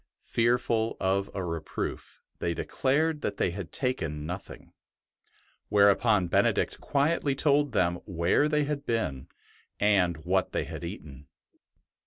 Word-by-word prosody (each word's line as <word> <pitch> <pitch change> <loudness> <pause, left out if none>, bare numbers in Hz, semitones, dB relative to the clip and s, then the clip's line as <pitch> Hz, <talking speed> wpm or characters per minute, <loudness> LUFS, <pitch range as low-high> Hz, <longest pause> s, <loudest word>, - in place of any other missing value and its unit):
Fearful 115 -1 +1
of 95 +1 0
a 95 - -2
reproof, 85 -2 -5 0.2
the}/ 85 -1 -1
de - - -4
clared 150 +3 +1
that - - -3
they 90 - +1
had 90 -2 -7
taken 80 - -2
nothing; 90 +4 -8 1.0
whereupon 100 -1 +4
Benedict - - +1
quietly 145 0 +1
told 145 -2 +2
them 85 -1 +2
where 90 - +2
they 150 -1 +2
had 145 0 -3
been 115 - -2 0.5
and 95 -5 +3
what - - +1
they - - 0
had - - -7
eaten. 70 -1 -8
100 Hz, 130 wpm, -28 LUFS, 85-140 Hz, 1.0 s, whereupon